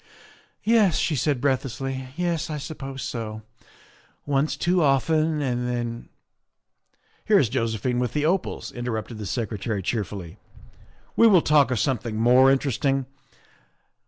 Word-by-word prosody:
" - - -29 0.2
Yes," 215 -7 +4
she 160 - 0
said 140 0 0
breathlessly, 135 0 -2
" 140 - -23
yes, 175 -2 -1
I 155 - -3
suppose 135 -2 -7
so. 110 -2 -5 0.8
Once 145 +1 0
too 180 +1 +1
often, 155 +2 +2
and 125 -2 -1
then 120 -1 -4 0.6
" - - -41
Here 215 - +5
is 130 - +3
Josephine 120 0 -1
with 125 -1 -1
the 150 0 0
opals," 180 +3 -1
interrupted 115 -2 -4
the 105 - -5
Secretary 110 -2 -3
cheerfully. 100 -4 -4 0.2
' - - -23
' - - -32
We 230 - +6
will 185 -6 +5
talk 145 -3 +4
of 125 - 0
something 120 -2 -1
more 125 +4 +5
interesting. 135 0 0
130 Hz, 150 wpm, -24 LUFS, 115-150 Hz, 0.8 s, We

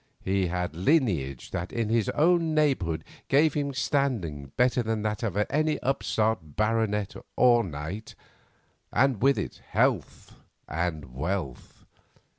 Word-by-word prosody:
He 95 -1 +1
had 90 -2 -3
lineage 90 - +1
that 85 +2 -4
in 115 -2 -1
his 115 -3 +1
own 165 0 +2
neighbourhood 95 - +1 0.2
gave 150 +2 +4
him 145 -1 -1
standing 120 - -1
better 125 0 +3
than 110 -2 -2
that 105 +2 -2
of 110 -6 -2
many 150 +9 +1
an - - -4
upstart 110 - 0
baronet 110 -2 0 0.2
or 120 -2 +5
knight, 85 +6 -6 0.8
and 130 -5 +2
with 135 +2 +4
it - - -5
health - - 0 0.3
and 80 -5 -3
wealth. 80 -2 -4
110 Hz, 130 wpm, -27 LUFS, 90-135 Hz, 0.8 s, or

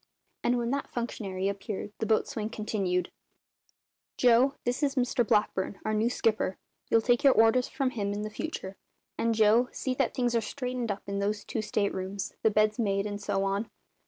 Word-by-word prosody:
And 245 +1 +2
when 235 0 -1
that 280 +1 -2
functionary 195 -5 -3
appeared 200 +1 -4
the 220 - -1
boatswain 215 -1 0
continued: 195 -5 -1 1.1
"Joe, 250 +3 +5
this 245 +3 0
is 280 -2 +1
Mr 245 -1 +2
Blackburn, 210 -3 0
our 215 - 0
new 215 +2 +2
skipper. 220 -5 0 0.3
You'll 225 - +4
take 240 +1 +2
your 275 -2 +7
orders 225 +3 +4
from 270 -3 -1
him 205 -5 -2
in 210 +1 -3
future; 200 -8 -5 0.4
and 230 0 +2
Joe, 220 +3 +4
see 260 - -2
that 255 -1 0
things 245 -2 +1
are 230 - +3
straightened 250 +1 -3
up 200 - -5
in 200 0 -3
those 205 +1 -1
two 225 - -2
state 210 -1 0
rooms, 190 +1 -4
the 220 - +4
beds 215 +1 +2
made, 200 -3 +1
and 205 -1 -4
so 200 -1 0
on." 200 +3 -1
215 Hz, 185 wpm, -29 LUFS, 200-245 Hz, 1.1 s, your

